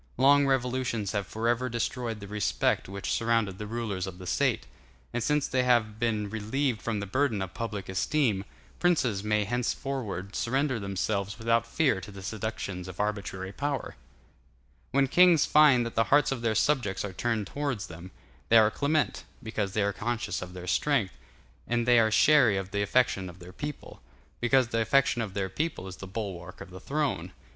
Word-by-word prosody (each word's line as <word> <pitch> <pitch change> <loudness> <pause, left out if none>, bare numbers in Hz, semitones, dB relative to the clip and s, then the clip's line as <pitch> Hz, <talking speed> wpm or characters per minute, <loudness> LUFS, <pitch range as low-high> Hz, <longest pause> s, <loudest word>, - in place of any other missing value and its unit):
Long 140 +2 +5
revolutions 125 -5 0
have 100 -3 -2
forever 120 +3 0
destroyed 120 -1 -3
the 100 - -8
respect 105 -2 0
which 100 0 -4
surrounded 115 -4 +1
the 105 - -5
rulers 105 -5 -3
of 90 -1 -7
the 90 - -10
State; - - +1 0.5
and 120 - -1
since 150 +4 +1
they 130 - +1
have 115 -4 +2
been 110 -3 0
relieved 110 +3 -1
from 110 -1 -2
the 100 - -3
burden 120 +1 0
of 95 -1 -4
public 105 -1 -4
esteem, 100 +2 +1 0.4
princes 125 - +2
may 105 0 +1
henceforward 120 -4 -3
surrender 130 0 0
themselves 100 0 -2
without 115 0 +1
fear 130 -5 +1
to 100 - -9
the 100 -1 -10
seductions 100 -3 -4
of 90 0 -9
arbitrary 100 -3 -3
power. 140 +4 -3 0.9
When 135 0 +2
kings 175 +1 +5
find 145 -6 +5
that 115 - -5
the 115 - +2
hearts 145 0 +4
of 130 -3 -2
their 115 -2 0
subjects 120 -6 +1
are 100 - -6
turned 115 +1 -1
towards 135 -3 -3
them, 85 +2 -10 0.4
they 115 - +7
are 110 -1 +6
clement, 145 -4 0 0.2
because 105 -3 -3
they 105 - +1
are 100 0 0
conscious 120 +2 -3
of 90 0 -7
their 90 -1 -8
strength, 105 - +1 0.5
and 120 0 0
they 120 -1 +6
are 110 -1 +4
chary 125 -2 +5
of 95 0 -4
the 100 - -1
affection 100 -3 +1
of 85 - -12
their 90 0 -12
people, 150 +7 -7 0.4
because 125 0 +3
the 115 -1 0
affection 125 0 +2
of 100 -4 -5
their 100 -1 -1
people 145 - -3
is 95 - -8
the 95 - -8
bulwark 95 -3 -6
of 90 - -10
the 95 - -9
throne. 150 0 -2
110 Hz, 185 wpm, -28 LUFS, 100-130 Hz, 0.9 s, they